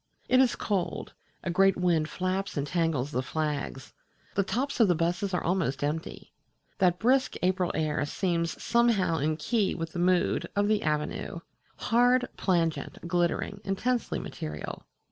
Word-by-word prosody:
It 255 - +4
is 260 -2 +4
cold: 195 -4 -2 0.3
a 180 - -1
great 195 +2 +4
wind 170 -4 +2
flaps 185 +2 -2
and 140 - 0
tangles 155 -4 0
the 125 - 0
flags; 145 -3 -3 0.4
the 200 - +2
tops 265 +8 -2
of 225 - +6
the 175 - +3
buses 175 +5 0
are 180 - -1
almost 165 -7 0
empty. 160 +4 -4 0.5
That 180 -2 +3
brisk 260 +5 +2
April 185 -1 +2
air 155 -2 0
seems 170 -1 -1
somehow 225 -9 +2
in 155 +2 0
key 210 +4 0
with 165 -1 -4
the 175 - -5
mood 180 0 +2
of 205 0 +2
the 215 -1 +2
Avenue 150 +2 -2 0.3
hard, 245 +2 +3
plangent, 170 -2 -1
glittering, 175 +3 0
intensely 235 +5 -1
material. 75 -1 -6
180 Hz, 150 wpm, -28 LUFS, 160-205 Hz, 0.5 s, of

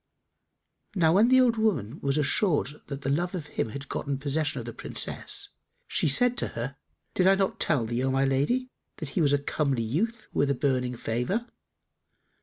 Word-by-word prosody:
Now 165 -3 +4
when 210 +5 +5
the 260 +1 +6
old 240 -3 +4
woman 175 - 0
was 140 +1 0
assured 150 0 +1
that 140 -1 -6
the 135 - -2
love 175 +6 0
of 165 -5 -4
him 115 - -3
had 140 +4 -7
gotten 140 0 -3
possession 145 +2 -1
of 120 - -5
the 120 - -6
Princess, - - -2 0.4
she - - +1
said 245 - +5
to - - 0
her, 125 +4 -3 0.4
"Did 185 - +3
I 195 - +6
not 195 -1 -1
tell 140 -8 +2
thee, 120 +3 -2
O 135 - +1
my 135 +1 +2
lady, 195 - 0 0.3
that 155 - -5
he 170 - -1
was 145 -3 +3
a 145 - +4
comely 140 -3 -1
youth 200 - -2
with 140 - +2
a 140 - +2
beaming 125 -2 0
favour?" 125 - -2
145 Hz, 195 wpm, -27 LUFS, 135-185 Hz, 0.4 s, the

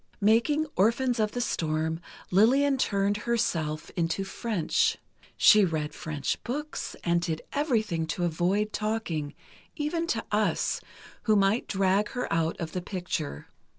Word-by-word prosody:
Making 235 +9 +3
"Orphans 235 +4 +2
of 215 -1 +1
the 245 - -1
Storm," 160 -5 -1 0.3
Lillian 265 +8 +4
turned 200 -2 +1
herself 185 -10 -1
into 170 +2 0
French. 230 - 0 0.4
She 210 -1 +7
read 155 -4 -1
French 145 -2 -3
books, 295 +5 -4
and 170 0 +2
did 160 -2 -3
everything 215 - 0
to 175 +2 -2
avoid 185 +6 0
talking, 195 -9 -2 0.4
even 330 +2 -1
to 225 -7 -1
us, 210 0 +1 0.4
who 215 - +4
might 200 +3 +2
drag 195 +1 +2
her 250 -1 -2
out 165 0 0
of 165 -2 -4
the 180 - -3
picture. 175 - -4
200 Hz, 135 wpm, -28 LUFS, 165-235 Hz, 0.4 s, She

